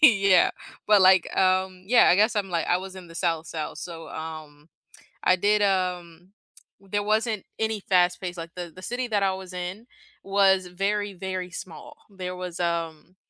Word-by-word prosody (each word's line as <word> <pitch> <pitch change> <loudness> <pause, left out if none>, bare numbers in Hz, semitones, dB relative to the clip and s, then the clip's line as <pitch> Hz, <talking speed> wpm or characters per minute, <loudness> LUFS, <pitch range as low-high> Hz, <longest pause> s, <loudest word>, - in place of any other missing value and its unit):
yeah, 195 - +6 0.4
but, 210 -2 +6
like, 185 -1 +5
um, 185 0 +1
yeah, 240 +3 +6
I 180 - +5
guess 215 +3 +3
I'm, 200 -2 0
like 170 -2 -1
I 175 - +2
was 190 0 -9
in 185 - -10
the 165 - -14
South, 165 -2 -1
South. 155 -2 -5
So, 165 -2 -8
um, 155 -2 -8 0.6
I 185 - +5
did, 205 +3 +2
um 180 -3 -1 0.5
there 195 +1 -3
wasn't 215 -1 0
any 220 -1 -1
fast-paced, 180 -1 +1
like, 165 0 -7
the 175 -2 -6
the 185 - -12
city 245 +4 -3
that 210 -3 0
I 190 -1 +2
was 190 -1 -8
in 180 +6 -6 0.4
was 195 -2 +3
very, 200 +3 -2
very 185 0 -4
small. 170 -1 -9
There 185 -2 -6
was, 180 -1 -6
um 170 0 -3
185 Hz, 175 wpm, -25 LUFS, 175-200 Hz, 0.6 s, yeah